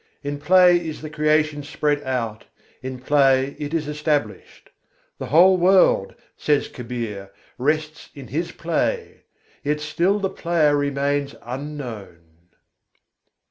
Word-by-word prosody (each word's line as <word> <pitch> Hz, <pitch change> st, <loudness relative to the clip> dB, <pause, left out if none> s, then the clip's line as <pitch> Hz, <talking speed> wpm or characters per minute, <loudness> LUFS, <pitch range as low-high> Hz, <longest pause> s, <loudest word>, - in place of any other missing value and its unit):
In 145 Hz, 0 st, -4 dB
play 180 Hz, +2 st, +5 dB
is 160 Hz, -3 st, -6 dB
the 155 Hz, -, -7 dB
Creation 150 Hz, -1 st, +1 dB
spread 145 Hz, 0 st, -1 dB
out, 120 Hz, -5 st, -3 dB, 0.4 s
in 130 Hz, -1 st, -6 dB
play 135 Hz, -1 st, +3 dB
it 145 Hz, -1 st, -4 dB
is 160 Hz, -3 st, -2 dB
established. 150 Hz, 0 st, -3 dB, 0.5 s
The -, -, -5 dB
whole 185 Hz, +3 st, +6 dB
world, 180 Hz, -, +3 dB, 0.2 s
says 145 Hz, -2 st, +1 dB
Kabîr, 115 Hz, -5 st, -6 dB, 0.3 s
rests 155 Hz, +3 st, -1 dB
in 135 Hz, -5 st, -10 dB
His 165 Hz, +5 st, -2 dB
play, 445 Hz, -, -2 dB, 0.4 s
yet 150 Hz, +1 st, 0 dB
still 170 Hz, +6 st, +1 dB
the 200 Hz, -2 st, -1 dB
Player 165 Hz, -5 st, +1 dB
remains 140 Hz, 0 st, -1 dB
unknown. 125 Hz, -, -7 dB
150 Hz, 120 wpm, -22 LUFS, 135-160 Hz, 0.5 s, whole